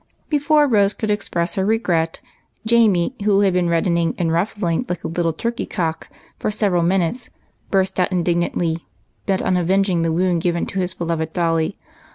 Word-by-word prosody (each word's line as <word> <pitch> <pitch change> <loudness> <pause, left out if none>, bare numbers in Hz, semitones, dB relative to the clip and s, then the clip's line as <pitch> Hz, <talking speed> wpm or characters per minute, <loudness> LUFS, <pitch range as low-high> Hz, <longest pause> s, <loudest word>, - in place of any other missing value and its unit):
Before 295 0 +3
Rose 205 -6 +2
could 215 -1 -2
express 170 -4 -1
her 190 - -1
regret, 180 -7 0 0.4
Jamie, 220 -3 +3
who 200 -1 +3
had 195 -2 +3
been 180 -1 +1
reddening 170 0 +1
and 165 -2 0
ruffling 175 +1 0
like 180 -1 -3
a - - -2
little 165 0 0
turkey 235 +9 -3
cock 165 -2 -3 0.3
for - - -1
several 205 -4 +1
minutes, 185 +7 0 0.4
burst 190 -1 +1
out 180 - +1
indignantly, 175 -2 0 0.5
bent 190 -2 +1
on 185 -1 +1
avenging 185 0 +1
the 165 0 +1
wound 175 0 +1
given 170 -1 0
to 195 - -4
his 185 0 -1
beloved 165 -2 -3
dolly. 165 0 0
180 Hz, 170 wpm, -20 LUFS, 170-200 Hz, 0.5 s, Before